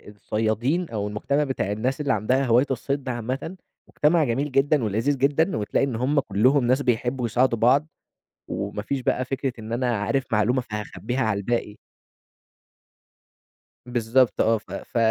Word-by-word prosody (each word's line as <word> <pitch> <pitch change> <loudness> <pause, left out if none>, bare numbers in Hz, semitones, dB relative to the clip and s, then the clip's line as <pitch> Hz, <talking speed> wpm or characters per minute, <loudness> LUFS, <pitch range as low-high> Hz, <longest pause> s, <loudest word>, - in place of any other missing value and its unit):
الصيادين 115 - -1
أو 105 -2 -3
المجتمع 140 +8 0
بتاع 130 -8 -2
الناس 125 +7 -1
اللي 145 - +1
عندها 125 +6 +1
هواية 120 +2 +4
الصيد 140 +2 -2
ده 130 - -3
عامةً، 130 +8 -4 0.3
مجتمع 155 +2 +2
جميل 135 +3 -1
جدًا 135 +1 +2
ولذيذ 115 +7 0
جدًا 145 +6 +2
وتلاقي 105 +5 0
إن 130 - -3
هم 130 +5 +1
كُلّهم 125 +4 +2
ناس 130 +3 +2
بيحبّوا 125 0 0
يساعدوا 120 0 +1
بعض 135 +7 +4 0.6
وما 100 +1 -4
فيش 135 +5 -3
بقى 125 +1 0
فكرة 135 0 -2
إن 110 +1 -6
أنا 120 -1 0
عارف 130 +7 0
معلومة 115 +4 +2
فهاخبِّيها 105 +1 -4
على 110 -4 +1
الباقي. 105 0 -2 2.1
بالضبط 120 +1 +2
آه. 115 +1 +3
ف 105 - -14
ف - - -6
125 Hz, 155 wpm, -24 LUFS, 110-135 Hz, 2.1 s, هواية